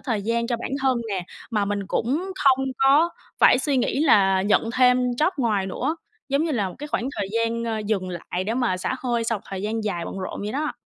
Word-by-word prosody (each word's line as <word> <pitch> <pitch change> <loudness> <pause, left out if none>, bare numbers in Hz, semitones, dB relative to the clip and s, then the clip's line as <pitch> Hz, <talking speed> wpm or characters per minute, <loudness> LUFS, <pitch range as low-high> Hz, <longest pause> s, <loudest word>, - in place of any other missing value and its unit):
thời 225 -6 -2
gian 235 +2 0
cho 240 -1 -1
bản 235 - -5
thân 260 -2 +3
nè, 190 -4 -2 0.3
mà 210 -3 +1
mình 200 -1 -2
cũng 305 - -1
không 270 -1 +5
có 280 +5 +5 0.3
phải - - +6
suy 275 +1 0
nghĩ 260 +2 0
là 195 -10 +4
nhận 215 +3 +2
thêm 250 -1 +4
job 300 +8 +1
ngoài 215 -8 0
nữa, 275 - -2 0.3
giống 280 +3 +1
như 330 - -1
là 205 -7 0
một 180 - -10
cái 295 - -6
khoảng 250 -2 -1
thời 200 -2 -2
gian 230 0 0 0.3
dừng 190 -4 0
lại 180 +1 -4
để 220 +3 -1
mà 245 -7 +1
xả 185 - -2
hơi 240 -2 -1
sau 225 -2 0
một - - -23
thời 195 -1 -5
gian 220 +1 -2
dài 175 -5 -2
bận - - -6
rộn 185 - -5
vậy 210 +1 -4
đó. 300 +3 -1
230 Hz, 235 wpm, -24 LUFS, 200-265 Hz, 0.3 s, phải